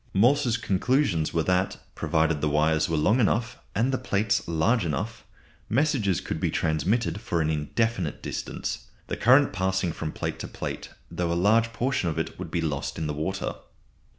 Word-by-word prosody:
Morse's 120 +3 +4
conclusions 100 - +1
were 80 - +1
that 90 +3 +1 0.2
provided 80 -2 +1
the 75 - +1
wires 80 +1 +2
were 80 - +1
long 105 +11 +3
enough 120 +2 +1 0.2
and 125 +5 +2
the 130 - 0
plates 100 0 0
large 85 +8 +2
enough 85 +8 -3 0.5
messages 120 - +2
could - - -4
be - - +1
transmitted 85 +5 0
for 100 -8 -1
an 80 -1 +1
indefinite 90 +3 -1
distance; - - -4 0.2
the - - -3
current 130 +4 +5
passing 95 -2 0
from 80 -1 -4
plate - - -4
to - - -5
plate, - - -5 0.2
though 85 0 -1
a - - +1
large 110 +6 +3
portion 120 -6 0
of 80 - -4
it 80 - -3
would 90 -3 -5
be 85 +1 -1
lost 75 -4 -2
in 80 - -2
the 75 - -2
water. 95 +6 -2
95 Hz, 180 wpm, -26 LUFS, 80-115 Hz, 0.5 s, current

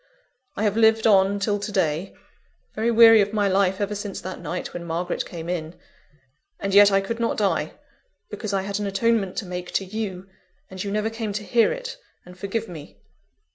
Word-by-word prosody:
I 210 - -2
have 210 -1 +1
lived 220 0 +4
on 200 -1 +4
till 205 0 0
to 205 +1 -5
day, 180 -2 -1 0.6
very 220 +2 0
weary 225 -1 +8
of 205 +1 -1
my 205 -2 +2
life 190 0 +2
ever 205 0 -1
since 205 -1 -5
that 185 0 -7
night 180 - -5
when 175 - -6
Margaret 170 +1 -3
came 170 -1 -7
in; 170 -1 -4 0.8
and 195 -1 -3
yet, 205 0 +8
I 195 0 +3
could 230 +4 -4
not 230 - 0
die, 185 -7 0 0.6
because 215 -3 -5
I 195 -1 0
had 200 +1 -3
an 205 - -2
atonement 200 -1 +1
to 205 - -2
make 180 0 -6
to 195 - 0
you, 195 -2 -5 0.4
and 185 -1 -5
you 200 - -4
never 215 +2 -1
came 225 -2 -4
to 210 +1 -4
hear 230 +2 +3
it - - -6 0.3
and 180 0 -13
forgive 205 +4 -3
me. 145 - -11
200 Hz, 200 wpm, -24 LUFS, 185-220 Hz, 0.8 s, weary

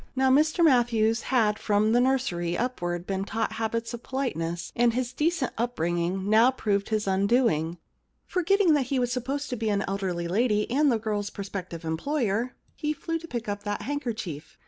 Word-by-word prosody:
Now 265 0 +3
Mr 310 +5 +4
Matthews 235 -5 +3
had 225 -5 +1
from 210 +1 +2
the 240 +1 +4
nursery 180 -10 0
upwards 175 -8 -2
been 195 0 -2
taught 220 +3 -2
habits 230 +1 -2
of 235 - -6
politeness, 175 -12 -3
and 235 -1 +3
his 255 0 -2
decent 305 -1 0
upbringing 180 -4 -1
now 220 +4 +6
proved 205 -6 -1
his 215 -1 0
undoing. 195 -4 +2 0.5
Forgetting 365 -1 +3
that 280 -4 +1
he 270 - 0
was 245 -1 0
supposed 270 +4 -3
to - - 0
be 225 -2 -1
an 200 -1 0
elderly 190 -3 -2
lady 210 +3 +1
and 285 +2 +3
the 235 - +2
girFs 210 -2 -2
prospective 185 -4 -6
em 160 0 -2
ployer, 245 - -1 0.2
he 300 0 -2
flew 330 +2 -3
to 335 - -10
pick 240 -6 -4
up 205 0 -3
that 205 0 -3
handkerchief. 230 - -4
225 Hz, 180 wpm, -27 LUFS, 195-260 Hz, 0.5 s, now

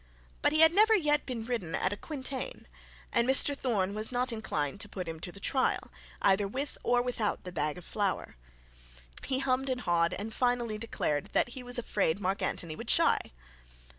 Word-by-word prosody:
But - - +3
he 310 +1 +3
had 320 +1 +8
never 435 +3 +6
yet 295 -6 +2
been 235 -4 -4
ridden 225 -9 -2
at 185 - +1
a - - -3
quintain, 275 - -5 0.5
and 235 0 +3
Mr 275 +2 +5
Thorne 205 -8 0
was 215 +3 -2
not 250 0 0
inclined 180 -8 -2
to 205 - -4
put 185 -3 -5
him 160 -1 -5
to 175 - -5
the 200 - -12
trial, 260 +6 0 0.3
either 200 +1 +4
with 270 +8 -3
or 245 0 +2
without 240 -4 -1
the 180 - -6
bag 155 -2 -1
of 180 - -10
flour. 200 -3 -2 0.9
He 260 - 0
hummed 265 0 0
and 255 -1 -1
hawed, 170 -2 +2
and 220 +3 -5
finally 240 -3 0
declared 150 -10 -2
that - - +3
he 255 +1 -7
was 245 0 -3
afraid 200 -7 0
Mark 195 0 -1
Antony 165 -4 -2
would - - -8
shy. - - +4
230 Hz, 195 wpm, -30 LUFS, 190-260 Hz, 0.9 s, had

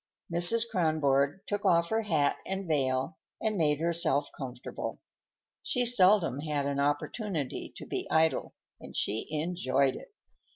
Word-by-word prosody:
Mrs. 200 +7 +7
Kronborg 155 -6 +1
took 205 0 -3
off 170 -3 +3
her 220 0 +1
hat 160 -9 +1
and 190 -1 -4
veil 135 +2 -1 0.2
and 215 -1 -1
made 150 -5 +2
herself 165 -4 +1
comfortable. 125 -2 -6 0.6
She 250 -1 0
seldom 190 - +4
had 145 -2 -2
an 140 0 -2
opportunity 145 - -2
to - - -9
be - - -4
idle, 160 0 +1 0.2
and - - -11
she 110 +2 -2
enjoyed 150 -4 0
it. - - -11
160 Hz, 135 wpm, -29 LUFS, 140-190 Hz, 0.6 s, Mrs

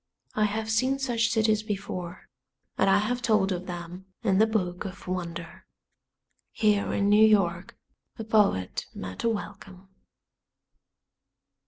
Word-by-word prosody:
I 215 - +2
have 220 +1 -2
seen 255 +5 +2
such 240 -4 0
cities 220 -2 +2
before, 190 -4 -5 0.5
and 195 - +2
I 195 - +5
have 240 +4 -1
told 210 -5 +2
of 185 0 -4
them 175 +1 -7 0.2
in 195 -3 +2
The 220 - +5
Book 180 -5 -1
of 195 -1 -9
Wonder. 170 -2 -5 0.8
Here 210 -2 +1
in 200 - +1
New 210 +1 +6
York 205 -5 +2 0.4
a 225 - -5
poet 205 - +1
met 95 0 -6
a 230 - +3
welcome. 195 -3 -7
205 Hz, 135 wpm, -27 LUFS, 185-220 Hz, 0.8 s, New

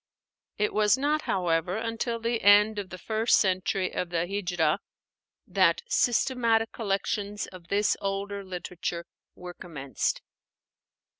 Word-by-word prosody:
It 210 0 0
was 210 +2 +4
not, 295 +3 +1
however, 175 0 0
until 230 +1 -2
the 230 0 -1
end 205 +1 +6
of 195 -2 -6
the 185 - -8
first 220 +4 +2
century 185 -1 0
of 180 - -2
the 170 -1 0
Híjrah 175 -5 0 0.7
that - - +2
systematic 235 - +2
collections 205 -1 -2
of 180 -2 -13
this 205 +3 +2
older 200 0 -3
literature 175 -2 -5 0.3
were 180 0 -8
commenced. 145 -7 -3
200 Hz, 125 wpm, -27 LUFS, 180-225 Hz, 0.7 s, end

